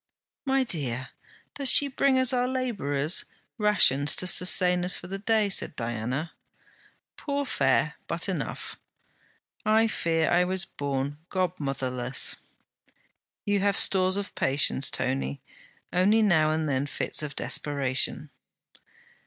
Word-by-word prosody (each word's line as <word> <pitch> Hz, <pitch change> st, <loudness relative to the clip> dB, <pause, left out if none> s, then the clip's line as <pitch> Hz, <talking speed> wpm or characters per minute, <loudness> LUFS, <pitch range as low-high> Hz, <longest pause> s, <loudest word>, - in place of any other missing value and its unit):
'My 270 Hz, 0 st, +2 dB
dear, 135 Hz, -, -3 dB, 0.4 s
does 280 Hz, -2 st, +1 dB
she 285 Hz, -, +6 dB
bring 270 Hz, 0 st, +1 dB
us 260 Hz, 0 st, +2 dB
our 250 Hz, 0 st, +1 dB
labourers' 195 Hz, -, 0 dB, 0.4 s
rations, 160 Hz, -9 st, +3 dB
to -, -, -1 dB
sustain 180 Hz, 0 st, +2 dB
us 180 Hz, +1 st, +1 dB
for -, -, -8 dB
the 195 Hz, +2 st, -6 dB
day?' 215 Hz, 0 st, +1 dB
said 195 Hz, -6 st, -2 dB
Diana.' 120 Hz, +7 st, -4 dB, 0.9 s
'Poor 285 Hz, -1 st, -3 dB
fare, -, -, +1 dB
but -, -, -3 dB
enough.' -, -, -5 dB, 0.9 s
'I 220 Hz, +1 st, +3 dB
fear 165 Hz, -5 st, 0 dB
I 175 Hz, +1 st, +4 dB
was 190 Hz, +1 st, -1 dB
born 140 Hz, -1 st, -4 dB
godmotherless.' 135 Hz, -8 st, 0 dB, 1.1 s
'You 205 Hz, 0 st, +1 dB
have 200 Hz, +1 st, +1 dB
stores 185 Hz, 0 st, +3 dB
of 200 Hz, -1 st, -5 dB
patience, 135 Hz, 0 st, +2 dB
Tony; 70 Hz, +1 st, -3 dB, 0.5 s
only 205 Hz, +5 st, +3 dB
now 160 Hz, -7 st, +3 dB
and 155 Hz, 0 st, -1 dB
then 140 Hz, 0 st, -1 dB
fits -, -, 0 dB
of 145 Hz, -2 st, -6 dB
desperation.' 135 Hz, -3 st, 0 dB
180 Hz, 125 wpm, -26 LUFS, 140-210 Hz, 1.1 s, she